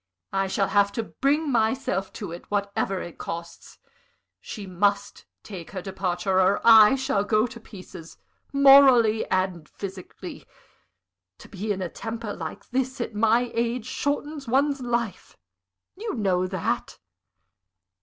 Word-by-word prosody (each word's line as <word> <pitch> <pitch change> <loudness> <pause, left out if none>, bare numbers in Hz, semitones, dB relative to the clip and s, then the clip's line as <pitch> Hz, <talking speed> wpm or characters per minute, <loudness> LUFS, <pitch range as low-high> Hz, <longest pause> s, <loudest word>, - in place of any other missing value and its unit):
I 195 0 +1
shall 195 +1 0
have 200 -1 +3
to 230 - -2
bring 285 +6 0
myself 220 -4 0
to - - -6
it, 170 - -10
whatever 200 -1 -1
it 175 - -10
costs. 170 0 -8 0.6
She 210 -3 -8
must 200 +2 -1 0.2
take 185 -6 -9
her 190 -3 -6
departure, 185 -1 -1
or 190 +2 +3
I 225 +1 +8
shall 235 -6 0
go 215 +1 +2
to 230 -1 -8
pieces, 185 -6 -12 0.3
morally 270 -5 +6
and 185 -4 -1
physically. 190 -2 -9 0.9
To - - -14
be 205 +2 -4
in 190 -2 -2
a - - -2
temper 225 0 -6
like 160 -2 -7
this, 260 0 -2
at 235 - -3
my 230 +3 +2
age, 235 0 -1
shortens 285 +1 -3
one's 275 +3 +1
life 235 -4 -3 0.6
you 435 - -5
know 185 -5 +1
that." 185 -2 -3
215 Hz, 135 wpm, -25 LUFS, 190-245 Hz, 0.9 s, I